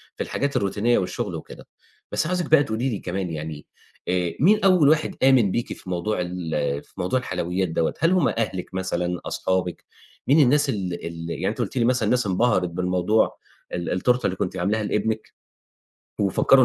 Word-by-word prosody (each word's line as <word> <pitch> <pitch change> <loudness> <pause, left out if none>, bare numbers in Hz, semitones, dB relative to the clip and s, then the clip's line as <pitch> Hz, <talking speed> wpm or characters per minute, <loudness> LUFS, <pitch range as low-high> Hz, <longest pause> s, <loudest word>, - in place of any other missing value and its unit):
في - - -2
الحاجات 140 0 -2
الروتينية 105 +4 +1
والشُغل 90 - -2
وكده. - - -10 0.4
بس 155 - 0
عاوزِك 180 -2 -2
بقى 150 -2 +7
تقولي 120 +1 -1
لي 105 - -3
كمان 90 0 -3
يعني، 75 -1 -6 0.4
آآ 90 -2 0
مين 205 +8 +5
أول 180 -7 +5
واحد 155 0 +2
آمن 125 -8 +5
بيكِ 120 - -2
في 90 - -12
موضوع 90 +2 -1
ال 90 -2 -4 0.3
في - - -26
موضوع 90 +9 0
الحلويات 90 -4 -2
دوّة؟ 80 0 0
هل 165 +3 +3
هم 185 -6 +3
أهلِك 95 -5 -3
مثلًا، 90 -2 -2
أصحابِك؟ 95 -1 -2 0.4
مين 145 +4 +5
الناس 145 +1 +4
ال 95 -9 -3
ال 85 0 -6
يعني - - -2
أنتِ - - -3
قُلتِ - - -2
لي 115 - +3
مثلًا 125 +1 +2
الناس 125 -4 +2
انبهرِت 95 -2 +2
بالموضوع 90 +4 +1 0.4
ال 85 0 -2
التورتة 125 +7 +1
اللي 95 - 0
كنتِ 95 0 -3
عاملاها 105 +5 0
لابنِك 105 +1 -2 0.9
وفكّروا 125 +6 +5
100 Hz, 175 wpm, -24 LUFS, 90-125 Hz, 0.9 s, بقى